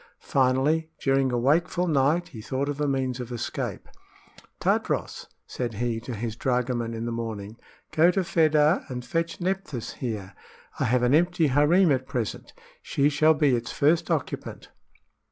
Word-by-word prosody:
Finally, 140 +5 +2
during 135 -1 +2
a 120 - 0
wakeful 170 +8 +2
night, 155 +2 +2
he 115 -6 -9
thought 130 +5 -2
of 145 0 -3
a 145 - +1
means 130 -2 -1
of 125 -1 -6
escape. 120 - -4 0.7
"Tadros," - - -1 0.2
said 120 -3 -4
he 115 +1 -1
to 120 +1 -6
his 110 0 -4
dragoman 125 -2 -1
in 115 +1 -4
the 120 - -2
morning, 110 -2 -5 0.4
"go 165 +3 +5
to 190 +1 +1
Fedah 155 -1 +3
and 125 -1 -5
fetch 165 0 -2
Nephthys 180 - -3
here. 105 -6 -5 0.5
I - - +1
have 125 +2 +2
an 125 +2 +3
empty 175 +1 +3
harem 150 +6 +4
at 130 -1 0
present; 125 -6 -4 0.3
she 140 +1 +1
shall 155 +2 +4
be 145 -4 +3
its 120 0 -4
first 155 +4 +2
occupant." - - -3
135 Hz, 160 wpm, -26 LUFS, 120-155 Hz, 0.7 s, go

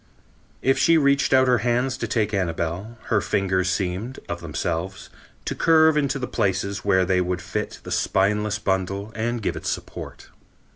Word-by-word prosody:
If 135 0 +3
she 165 - +5
reached 140 -2 +3
out 130 0 +5
her 125 -2 +4
hands 125 +3 0
to 115 - -3
take 105 -1 0
Annabel, 90 +4 -2
her 105 -3 +3
fingers 95 -2 0
seemed, 95 +7 -2
of 85 0 -4
themselves, 85 +3 -4 0.3
to - - -2
curve 160 -1 +4
into 140 -2 +1
the 130 - -3
places 100 -2 -1
where 95 -2 +3
they 90 0 +2
would 90 0 -1
fit 90 - -4
the - - -8
spineless 105 +2 +1
bundle 100 +1 -2
and 120 0 -2
give - - -1
it - - -6
support." - - -6
100 Hz, 165 wpm, -23 LUFS, 95-125 Hz, 0.3 s, she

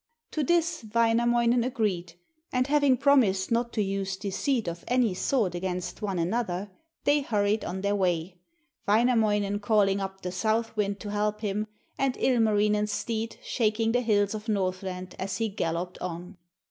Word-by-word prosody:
To 310 - -1
this 335 0 +1
Wainamoinen 235 +1 +3
agreed; 210 -9 -1 0.4
and 250 0 +1
having 285 -2 +3
promised 230 -10 +3
not 235 +1 +1
to 215 - +1
use 195 -1 -2
deceit 215 +4 -1
of 170 0 -5
any 245 -5 +2
sort 200 -1 0
against 180 0 -4
one 195 -3 -2
another, 190 +1 -1 0.3
they 290 0 +3
hurried 210 -4 +1
on 190 +1 -4
their 200 +1 +1
way, 180 -2 -1 0.5
Wainamoinen 210 -2 +2
calling 205 -2 +2
up 190 0 -5
the 180 - -4
south 220 +5 0
wind 200 -1 -1
to 205 - -5
help 210 +1 -1
him, 210 0 -2 0.3
and 270 -2 +1
Ilmarinen's 210 -3 +2
steed 225 +1 -3
shaking 225 -1 +1
the 245 +1 +2
hills 205 -3 +2
of 215 +1 -6
Northland 185 -2 -2
as 190 0 -3
he 225 -1 0
galloped 180 -2 -3
on. 180 +2 -6
210 Hz, 155 wpm, -27 LUFS, 190-235 Hz, 0.5 s, Wainamoinen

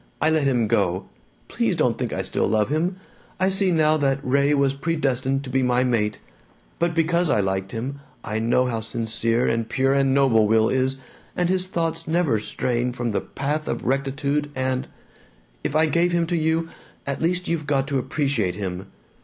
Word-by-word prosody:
I 155 - +2
let 155 -3 +2
him 125 -4 +2
go. 100 -4 +1 0.4
Please - - 0
don't - - +2
think - - -3
I - - -2
still - - 0
love 105 +1 +1
him! 165 +5 0 0.4
I 185 +1 +3
see 195 0 +2
now 155 -2 +3
that 135 -2 +1
Ray 140 +2 +2
was 140 -1 +2
predestined 135 -3 -1
to 130 - -7
be 130 +1 +2
my 125 0 +2
mate. 110 -4 0 0.6
But 170 -1 0
because 170 +1 +2
I - - +3
liked 95 -1 -1
him, 130 +5 -4 0.2
I 110 -1 -2
know 120 +3 +2
how 115 -3 -1
sincere 115 +1 0
and 115 -1 -1
pure 135 +1 +2
and 135 -1 +2
noble 130 -6 +4
Will 110 +1 +3
is, 130 +1 +1 0.4
and 175 -1 +1
his 185 0 +1
thoughts 165 -2 -2
never 160 -8 +2
straying 120 +3 -1
from 120 -2 -2
the 100 - 0
path 150 +3 -3
of - - -3
rectitude, 140 +3 -1
and 130 0 -1 0.8
If - - -2
I 155 +1 +5
gave 170 +2 +1
him 170 -1 +2
up 165 - -4
to 175 - +1
you, 160 0 0 0.4
at 140 -1 -3
least 180 +2 0
you've 160 -3 -2
got 135 -2 +1
to 140 -2 +1
appreciate 135 - -1
him! 95 -1 -5
135 Hz, 195 wpm, -23 LUFS, 120-160 Hz, 0.8 s, I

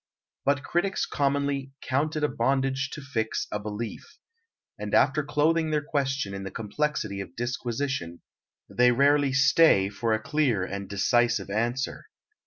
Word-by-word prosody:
But 140 0 +2
critics 190 +3 0
commonly 140 -1 -1
"count 145 +4 -1
it 155 - -2
a - - +4
bondage 135 +1 0
to 150 - -6
fix 115 -6 -2
a 105 - -2
belief," 105 - -6 0.6
and - - -2
after 150 - +3
clothing 155 +3 +1
their 150 -1 0
question 135 -7 -1
in 100 - -5
the 95 - -5
complexity 110 -2 -2
of 90 -3 -10
disquisition, 120 -6 -3 0.5
they 125 0 +4
rarely 140 +2 +3
"stay" 130 -6 +5
for 110 +3 -2
a 110 - +1
clear 125 -6 +1
and 100 0 -6
decisive 105 0 +1
answer. 120 +5 -2
130 Hz, 145 wpm, -27 LUFS, 110-145 Hz, 0.6 s, stay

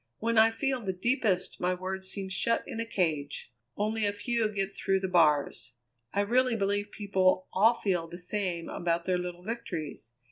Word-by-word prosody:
"When 230 +1 0
I 220 +1 +7
feel 260 +2 -1
the 190 -3 -2
deepest 190 -3 0
my 180 +1 +1
words 190 +1 -4
seem 190 0 -3
shut 230 +5 +1
in 225 - -6
a 230 - -2
cage; 155 - -2 0.2
only 215 +1 0
a 205 - +2
few 230 +1 0
get 195 -1 -2
through 195 0 +1
the 190 - -2
bars. 150 -8 +2 0.4
I 200 - +1
really 245 +3 +2
believe 205 0 0
people 190 -2 +1
all 220 +5 +5
feel 180 -7 -1
the 170 - -8
same 180 -2 -2
about 170 0 -1
their 185 -1 +1
little 180 0 -6
victories. 170 - -5
190 Hz, 180 wpm, -29 LUFS, 180-220 Hz, 0.4 s, I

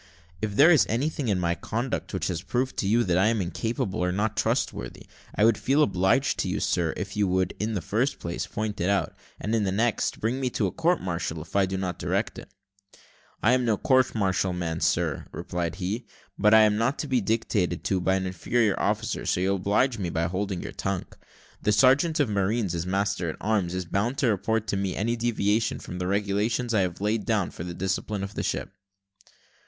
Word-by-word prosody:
"If 105 -2 -2
there 150 +9 +7
is 155 -7 +5
anything 140 +3 -1
in 100 -4 +1
my 85 -1 +1
conduct 115 +8 -3
which - - -2
has 85 -2 -2
proved 120 +7 -1
to 95 - 0
you 115 +4 +3
that 90 -3 +2
I 95 - +4
am 115 0 +1
incapable, 100 +2 -2
or 90 0 +1
not 105 +3 -1
trustworthy, 110 - -2 0.3
I 105 - +4
would 115 -2 +4
feel 140 +3 +3
obliged 95 +6 +2
to - - 0
you, - - -1
sir, 85 -2 0
if 100 +1 -5
you 105 -1 +2
would, 95 0 +1
in 110 +1 -1
the 90 - -2
first 115 - 0
place, 85 0 -4
point 105 -2 -3
it 90 - +1
out; 100 -5 0 0.2
and, 105 - -2
in 110 -2 +2
the 95 - 0
next, 115 +4 0
bring 115 +5 -1
me 130 -2 0
to - - -1
a - - -1
court 170 +2 +1
martial 85 -3 -3
if - - -16
I 100 -1 +4
do 95 +1 -3
not 90 -2 -3
correct - - -1
it." - - -12 0.9
"I 115 - +5
am 130 0 +2
no 115 -3 +2
court 130 +1 +2
martial 95 -3 +1
man, 85 -2 -3
sir," - - 0
replied 85 -2 -3
he, 100 +6 -3 0.3
"but 105 - +3
I 110 - +8
am 105 -1 +4
not 125 +5 +1
to 150 - -3
be 130 -3 +2
dictated 95 -6 0
to 95 -1 0
by 95 +1 +2
an 95 0 -1
inferior 100 +3 0
officer, - - -1
so - - +1
you'll 95 +2 +1
oblige 105 +6 +1
me 90 -3 -2
by 80 0 -1
holding 95 +1 -2
your - - -6
tongue. 95 -2 -3 0.6
The 105 - +2
sergeant 135 +9 +4
of 145 - +3
marines, 100 -1 0
as 85 +1 -3
master 95 -2 0
at - - -5
arms, 100 -4 0
is 90 -1 -2
bound 105 +9 -1
to 130 - +2
report 110 +2 0
to 100 - 0
me 95 -2 -1
any 115 +4 0
deviation 115 -2 0
from 90 - -7
the 90 - -2
regulations 105 +5 0
I 105 - +3
have 90 0 -2
laid 105 +1 0
down 105 -6 0
for - - -7
the 85 0 -6
discipline 95 +2 -2
of 100 +1 -5
the - - -3
ship." - - -3
100 Hz, 220 wpm, -26 LUFS, 95-115 Hz, 0.9 s, I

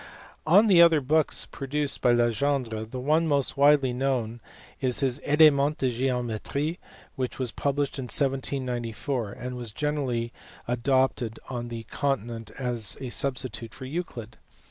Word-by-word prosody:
Of 200 +7 +6
the 180 -4 +7
other 165 -2 +6
books 155 +3 +1
produced 145 +1 -3
by 125 - +4
Legendre, 120 -1 0
the 125 +3 -7
one 155 +5 +2
most 140 -3 +1
widely 140 -2 +4
known 125 -3 -1 0.4
is 130 0 +1
his 135 0 0
Elements 150 -1 +4
de 130 -2 +1
geometrie 125 - -2 0.4
which 130 -2 -3
was 125 -3 -2
published 140 +2 -1
in 130 - -4
1794, 125 -4 -2
and 125 0 -6
was 120 -3 -5
generally 130 -4 -2 0.3
adopted 125 -1 0
on 120 -1 -4
the 115 -1 -6
continent 120 -3 -3
as 120 -6 -1
a 130 - -5
sub 135 +1 0
stitute 120 -2 -5
for 130 - -8
Euclid. 130 -7 -6
130 Hz, 145 wpm, -26 LUFS, 120-145 Hz, 0.4 s, the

